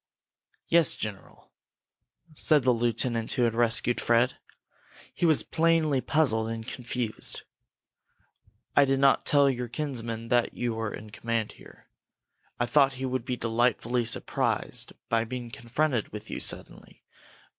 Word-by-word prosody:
"Yes, 165 -4 +4
general," 100 -4 -8 0.8
said 150 -1 +3
the 125 0 +4
lieutenant 115 0 0
who 125 - +1
had 115 -2 +2
rescued 120 +1 +1
Fred. 120 +2 +2 0.8
He 175 - +1
was 155 -3 +3
plainly 160 -4 +2
puzzled 125 -6 +1
and 115 0 -5
confused. 120 -2 -2 1.3
"I 145 - +7
did 135 -1 +1
not 140 0 +3
tell 145 -2 +5
your 125 -2 -1
kinsman 115 -4 -5
that 120 -1 +1
you 120 -1 -2
were 110 -1 -3
in 105 0 -9
command 115 0 -2
here. - - -17 0.7
I 120 - +2
thought 135 +1 +3
he 130 0 -5
would 130 -2 -2
be 125 -1 -3
delightfully 120 +1 0
surprised 115 - 0 0.2
by 115 -1 +1
being 120 0 -6
confronted 120 +1 -1
with 105 +1 -9
you - - -4
suddenly. - - -6
120 Hz, 135 wpm, -27 LUFS, 115-135 Hz, 1.3 s, I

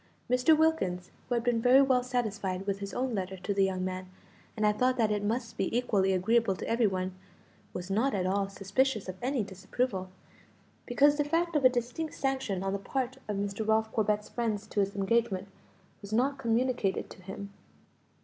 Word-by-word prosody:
Mr. 250 +5 +5
Wilkins, 190 - +1 0.2
who 245 - +1
had 235 - 0
been 240 -2 +1
very 250 +3 +6
well 260 -2 +3
satisfied 205 -7 -2
with 200 -1 -1
his 200 0 -5
own 255 -1 -2
letter 190 -2 -3
to 185 +3 -2
the 195 0 +3
young 185 -1 0
man, 185 0 -4 0.5
and 215 - +1
had 210 0 +2
thought 255 0 +3
that 220 -3 +2
it 205 -1 0
must 225 +1 -2
be 230 - 0
equally 200 -6 +2
agreeable 200 +2 +2
to - - -6
every 230 -1 +3
one, 185 -1 -2 0.6
was 180 +2 -6
not 225 +5 +2
at 185 -2 0
all 195 +1 0
suspicious 200 +4 0
of 185 - -5
any 255 -2 0
disapproval, 190 +1 -3 0.8
because 285 +4 +4
the 295 - +3
fact 330 +3 0
of 295 - +2
a 255 - +8
distinct 250 +6 -3
sanction 265 -9 -1
on 195 0 -1
the 200 - -1
part 260 +5 -3
of 210 -2 -2
Mr. 200 +2 -3
Ralph 220 0 +2
Corbet's 210 -1 +1
friends 220 -3 -2
to - - -2
his 200 0 0
engagement 200 -1 +1 0.5
was 200 0 -10
not 265 +5 +1
communicated 235 -4 0
to - - -12
him. 200 +2 -8
215 Hz, 195 wpm, -30 LUFS, 195-250 Hz, 0.8 s, a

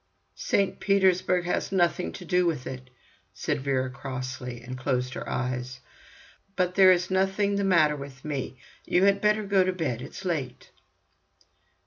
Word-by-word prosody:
"St. 200 - +1
Petersburg 185 -2 +2
has 180 - -1
nothing 180 -1 +1
to 180 - -9
do 180 +1 +2
with 150 -7 -2
it," 130 -1 -7 0.5
said - - -2
Vera 130 -2 -1
crossly, 130 -2 -6
and 125 +1 -6
closed 130 -1 -1
her - - -6
eyes. 125 0 -3 0.8
"But 180 -1 0
there 190 0 +7
is 180 0 +1
nothing 195 +2 +1
the 200 - 0
matter 165 -6 +4
with 140 -1 -10
me. 140 -3 -4 0.3
You 180 - +2
had 200 0 +4
better 210 0 +2
go 195 -2 +3
to 185 - 0
bed, 155 -10 -3
it's 190 - -9
late." 145 -8 -3
170 Hz, 155 wpm, -27 LUFS, 130-190 Hz, 0.8 s, there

